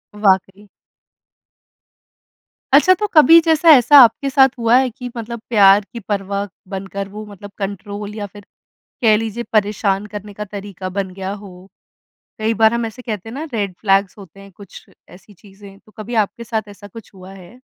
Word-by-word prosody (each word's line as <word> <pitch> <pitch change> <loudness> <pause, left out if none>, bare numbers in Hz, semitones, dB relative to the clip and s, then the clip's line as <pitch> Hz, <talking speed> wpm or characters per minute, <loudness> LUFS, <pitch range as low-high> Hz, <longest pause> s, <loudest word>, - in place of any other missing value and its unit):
वाक़ई। 195 0 0 2.1
अच्छा, 300 +7 +6
तो 420 +3 -3
कभी 325 -2 +6
जैसा, 325 0 +2
ऐसा 290 +1 +6
आपके 245 +4 +1
साथ 265 0 +5
हुआ 230 +1 +3
है 260 0 +1
कि 250 +1 -9
मतलब 235 0 -7
प्यार 200 -2 +5
की 235 - -6
परवाह 200 -1 -4 0.2
बनकर 195 0 -6
वो 210 +2 -9
मतलब 205 -1 -12
कंट्रोल 205 +1 -6
या 210 -2 -5
फिर 205 0 -15 0.6
कह 220 -3 +4
लीजिए 225 +1 -4
परेशान 205 -1 0
करने 205 0 -8
का 210 +1 -7
तरीका 195 -2 -8
बन 190 0 -4
गया 190 0 -6
हो? 190 -2 -13 0.7
कई 220 +1 0
बार 220 +1 +3
हम 235 0 -1
ऐसे 225 +3 -9
कहते 220 -3 -6
हैं - - -10
ना 295 - -5
रेड 200 -4 -2
फ्लैग्स 195 -1 +1
होते 195 -2 -15
हैं, 195 0 -14
कुछ 200 0 -14 0.2
ऐसी 195 +3 -17
चीज़ें, 195 +1 -16
तो 215 - -24
कभी 220 +3 -6
आपके 235 - -13
साथ 220 -2 -4
ऐसा 205 0 -13
कुछ 225 +2 -14
हुआ 185 0 -13
है? 195 +6 -15
205 Hz, 175 wpm, -18 LUFS, 195-230 Hz, 2.1 s, अच्छा